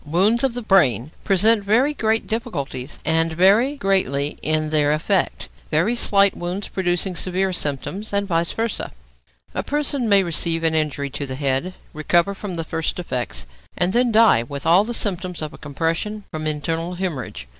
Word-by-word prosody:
Wounds 195 - +2
of 260 -3 +1
the 245 - -4
brain 155 - +3
present 205 +2 +3
very 240 +9 +2
great 220 -4 0
difficulties, 145 - -4
and 165 +1 +2
vary 205 - +4
greatly 185 - 0
in 155 0 0
their 150 -1 +3
effect, 180 +5 0 0.2
very 165 +9 +1
slight 200 -4 +3
wounds 180 +3 -4
producing 180 0 -1
severe 185 +2 0
symptoms, 150 +6 -4
and 200 0 0
vice 170 -2 0
versâ. 230 -1 -2 0.6
A - - -1
person 285 -5 -1
may 200 -1 +5
receive 165 -1 0
an 165 -1 +2
injury 145 -3 -1
to 140 +1 -4
the 130 - -4
head, 140 +6 -1 0.2
recover 170 +5 +1
from 195 -2 -6
the 165 - -3
first 160 0 -3
effects, 130 -9 -4 0.3
and 180 +2 +1
then 245 0 +3
die 220 - +5
with 140 +4 -7
all 175 +4 +5
the 240 +2 -3
symptoms 185 -5 -2
of 155 -1 -7
compression 165 +8 -2
from 155 -1 -4
internal 165 +3 -2
hæmorrhage. 155 - -4
175 Hz, 165 wpm, -21 LUFS, 155-205 Hz, 0.6 s, may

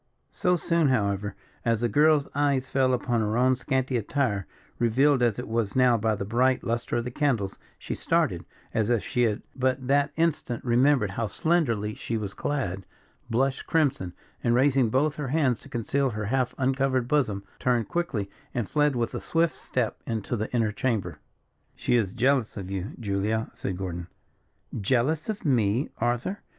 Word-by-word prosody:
So 180 -2 +1
soon, 170 -2 +2
however, 105 -4 0 0.3
as 115 -2 +1
the 120 - +2
girl's 150 +5 +4
eye 145 -1 +2
fell 130 0 +1
upon 120 -2 0
her 110 +1 0
own 130 +1 +4
scanty 130 0 -1
attire, 115 -4 -1 0.3
revealed 130 +4 +3
as 120 -4 +2
it 125 - -5
was 110 -3 -1
now 125 -2 +5
by 110 -1 +1
the 100 - -4
bright 125 +4 +2
lustre 115 0 -1
of 120 - 0
the 125 - -5
candles, 120 -9 0 0.2
she - - -5
started, - - 0 0.3
as 110 0 +1
if 120 -3 +2
she 125 - -1
had 110 -3 +1
but 130 0 0
that 140 +2 +2
instant 160 -8 -1
remembered 125 -3 +3
how 115 +2 -2
slenderly 115 -6 0
she 115 +2 -3
was 100 -3 -4
clad; 100 -11 -2 0.5
blushed 130 +3 0
crimson, 140 - +1 0.3
and 120 0 +3
raising 130 -2 +3
both 145 +5 +1
her 150 -2 -3
hands 130 -4 +1
to - - -14
conceal 135 +4 0
her 110 -2 -4
half 130 +3 0
uncovered 130 -1 +1
bosom, 120 -9 +1 0.2
turned 120 -4 +1
quickly, 145 - -2 0.3
and 120 -5 -1
fled 150 -2 +2
with 120 -1 -1
a - - -4
swift 165 0 +1
step 125 -3 -2
into 115 0 -2
the 110 -1 -3
inner 115 -3 +1
chamber. 110 -2 -2 0.6
"She - - 0
is 110 -6 +1
jealous 125 0 +1
of 95 -1 -6
you, 100 +6 -4
Julia," 105 +1 -1
said 95 - -4
Gordon. 90 -2 -5 0.7
"Jealous 135 - +1
of 210 -4 -4
me, 120 -1 +2
Arthur?" 120 +12 -1
120 Hz, 175 wpm, -26 LUFS, 110-135 Hz, 0.7 s, now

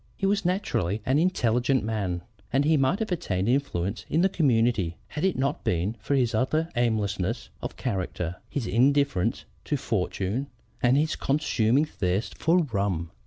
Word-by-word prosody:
He 195 - -1
was 200 +1 +2
naturally 140 - 0
an 135 +3 +3
intelligent 130 -7 +2
man; 100 -5 -2 0.3
and 135 +2 +2
he 160 +1 +4
might 140 +6 +2
have 220 -2 -3
attained 95 - -1
influence 105 -7 0
in 160 - +2
the 190 - +4
community 115 - +2
had 150 - -4
it 190 -1 +2
not 140 +3 -1
been 90 +6 0
for 140 - -1
his 125 -3 +2
utter 155 +8 +1
aimlessness 110 -2 0
of - - -6
character, 90 -2 -3
his 135 -2 -3
indifference 135 -4 +2 0.2
to - - 0
fortune, 105 +9 -2 0.3
and 125 +2 +4
his 155 +2 +1
consuming 135 -2 +2
thirst 95 -6 -2
for 170 +2 +3
rum. 95 -5 -1
120 Hz, 160 wpm, -26 LUFS, 100-145 Hz, 0.3 s, he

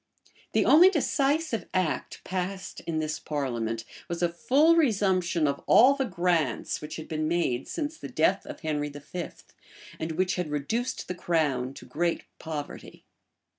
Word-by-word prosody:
The - - +3
only 345 +5 +8
decisive 290 - 0
act 185 -4 -1
passed 185 +1 -4
in 165 -2 -1
this 155 -1 -2
parliament, 115 -6 -3 0.2
was 170 0 -2
a 175 - +3
full 280 - +4
resumption 190 - +2
of 140 0 -2
all 255 +5 +7
the 275 -1 -1
grants 170 - 0
which 150 +1 -6
had 160 - -7
been 155 -1 -2
made 155 -7 0
since 315 0 -4
the - - -7
death - - +2
of - - -8
Henry 150 -3 -1
V., 145 +5 -6 0.7
and 160 0 -3
which 185 +3 0
had 180 -4 -2
reduced 150 - -2
the 180 - -2
crown 145 -7 0
to - - -11
great 170 +1 -1 0.2
poverty. 155 -3 -7
170 Hz, 155 wpm, -27 LUFS, 150-200 Hz, 0.7 s, only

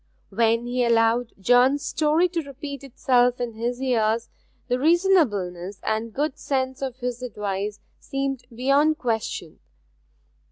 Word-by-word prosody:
When 230 +3 +2
he 245 +1 0
allowed 230 0 +2
John's 250 +7 +4
story 315 +3 +2
to 340 -1 -2
repeat 280 -1 -8
itself 250 -2 +2
in 240 -2 -3
his 240 +3 -3
ears, 230 -3 +1 0.4
the 250 0 0
reasonableness 220 - +2
and 220 +1 -1
good 290 +4 -2
sense 260 -1 -2
of 265 -3 -3
his 250 -1 -4
advice 205 -3 -4 0.2
seemed 275 -2 -3
beyond 275 +6 +2
question. 225 -3 -3
245 Hz, 125 wpm, -24 LUFS, 225-275 Hz, 0.4 s, John's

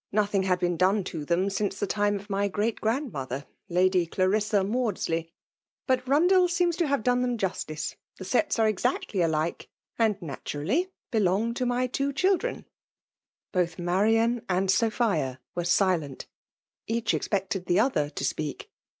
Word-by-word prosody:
103 - - -10 0.2
Nothing 190 0 -1
had 180 -1 +2
been 175 -1 0
done 190 +3 +3
to 165 -4 -5
them 175 +5 +1
sinee 200 0 -1
the 205 - -1
time 205 +1 +1
of 200 +1 -7
my 200 0 0
great 210 +3 -1
great 230 +7 +1
grazidmother, 135 - -5 0.2
Lady 180 0 +3
Clmnam 200 +2 +1
Maudsley. 180 -9 -1 0.5
But 255 -1 +1
BundeU 355 +7 +4
seems 345 -1 +1
to 340 - +1
hare 280 0 +2
done 245 +2 +1
them 245 -1 0
jnstiee. 175 -6 -3 0.2
The 190 - -8
seta 235 +2 +1
are - - +4
exactly 205 -1 -1
alike^ 160 -1 0 0.3
and 220 -3 +2
natmrally 165 - -2 0.2
belong 215 +1 +1
to 250 +1 -1
my 245 +1 +1
two 275 +3 -1
children." 385 - 0 0.9
Soth 175 -3 0
Marian 220 +7 +2
and 185 +1 +2
Sophia 210 - +1
were 175 - -2
silent. 175 -6 +1 0.6
Each 230 0 0
expected 195 -2 -2
the 180 +2 +3
other 210 - +2
to 140 -2 -4
speak. 150 +1 -4
200 Hz, 160 wpm, -27 LUFS, 175-240 Hz, 0.9 s, BundeU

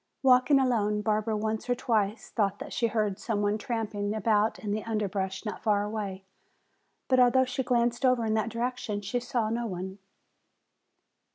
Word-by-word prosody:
Walking 255 +2 +5
alone, 210 -5 +1
Barbara 215 0 0
once 220 +2 -3
or 245 - +3
twice 220 -4 -1
thought 200 -3 0
that - - -8
she 235 - +1
heard 210 -3 -1
some 210 -3 -1
one 205 +1 +1
tramping 215 -4 -2
about 215 0 +2
in 210 - -5
the 215 +1 -2
underbrush 200 -3 -2
not 210 - -5
far 205 -2 +2
away. 205 -3 -4 0.8
But 255 -1 +3
although 255 +1 +5
she 255 +1 -2
glanced 240 -1 +1
over 255 -3 +3
in 215 - 0
that 220 +1 0
direction 230 -3 -3
she 205 +5 -2
saw 240 -2 -1
no 235 +1 -1
one. 190 0 -6
220 Hz, 170 wpm, -28 LUFS, 205-240 Hz, 0.8 s, Walking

